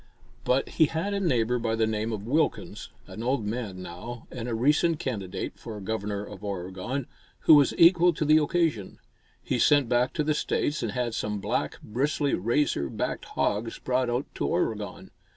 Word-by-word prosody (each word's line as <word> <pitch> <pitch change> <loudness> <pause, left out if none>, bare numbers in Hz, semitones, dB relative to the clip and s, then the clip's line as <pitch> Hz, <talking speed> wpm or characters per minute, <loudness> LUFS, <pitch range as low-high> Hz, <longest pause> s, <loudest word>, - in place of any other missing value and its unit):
But 130 +2 +2
he 160 - +4
had 165 +7 -2
a 200 - 0
neighbor 125 - +1
by 115 -1 0
the 110 0 +2
name 110 +1 -1
of 105 -2 -4
Wilkins, 150 +7 -1 0.2
an 110 - -8
old 125 -1 0
man 105 -4 -4
now, 115 +8 -8
and 125 -1 -5
a 115 - -1
recent 150 +7 +3
candidate 105 -10 -4
for 110 -2 -7
Governor 105 0 -3
of 105 -1 -11
Oregon, 95 +7 -4 0.4
who - - +7
was 145 -3 +5
equal 175 +1 +6
to 155 - -2
the 155 +1 +6
occasion. 150 - 0 0.5
He - - -1
sent 145 -4 +4
back 125 +1 +2
to 150 - 0
the 155 +1 +1
States 150 0 -1
and - - -2
had 125 -3 -1
some 105 -2 -2
black, - - -2
bristly, 140 +5 0
razor 110 - +1
backed - - -3
hogs 110 +3 -1
brought 125 -1 0
out 120 +3 -1
to - - -2
Oregon. - - -2
120 Hz, 180 wpm, -27 LUFS, 105-145 Hz, 0.5 s, who